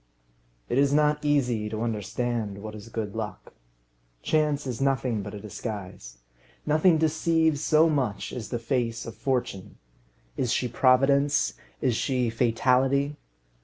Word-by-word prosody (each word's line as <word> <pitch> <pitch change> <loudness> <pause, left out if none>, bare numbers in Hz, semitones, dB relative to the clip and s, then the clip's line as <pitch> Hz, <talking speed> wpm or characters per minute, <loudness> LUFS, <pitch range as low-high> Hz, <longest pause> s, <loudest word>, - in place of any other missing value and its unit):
It 125 - +1
is 140 0 +3
not 150 0 +2
easy 125 -7 +1
to 110 +1 -3
understand 115 -1 -2
what 110 0 -6
is 110 +2 -10
good 110 -3 -4
luck. 110 -2 -6 0.7
Chance 150 -2 +1
is 125 -1 -4
nothing 130 -5 +1
but 100 +1 -7
a - - -6
disguise. 95 - -7 0.5
Nothing 155 +3 +4
deceives 160 -1 +2
so 155 +1 +4
much 130 -10 -1
as 120 -4 -6
the 120 - -2
face 115 -1 -2
of 115 - -7
fortune. 115 -5 -3 0.6
Is 125 - -1
she 125 - +1
Providence? 135 +4 +3 0.3
Is 125 - +1
she 125 -2 0
Fatality? 130 +4 +2
125 Hz, 135 wpm, -26 LUFS, 110-145 Hz, 0.7 s, Nothing